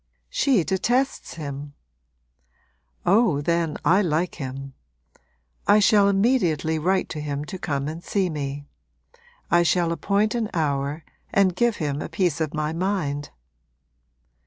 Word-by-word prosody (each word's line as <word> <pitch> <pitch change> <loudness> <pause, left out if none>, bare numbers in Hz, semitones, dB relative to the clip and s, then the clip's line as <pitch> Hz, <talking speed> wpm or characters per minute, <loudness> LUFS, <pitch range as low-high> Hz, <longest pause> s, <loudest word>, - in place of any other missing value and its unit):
'She 275 - +3
detests 240 +10 0
him.' 145 -2 -7 1.3
'Oh, 195 -4 +4
then, 165 +1 0
I 190 +4 +5
like 170 -1 0
him! 135 +1 -6 0.9
I 210 - +6
shall 205 -1 +5
immediately 195 - +2
write 185 +4 +1
to 155 - -5
him 145 0 -3
to 185 +4 -7
come 140 -5 -2
and 160 +3 -6
see 195 -2 0
me: 145 -3 -4 0.9
I 175 - +5
shall 170 0 +2
appoint 200 +5 +1
an 230 -3 -1
hour 145 -1 -1 0.3
and 190 -3 +3
give 240 +2 +2
him 150 -4 -2
a - - -5
piece 175 -5 0
of 155 -2 -1
my 155 -1 -2
mind.' 165 -5 -2
170 Hz, 135 wpm, -24 LUFS, 145-200 Hz, 1.3 s, I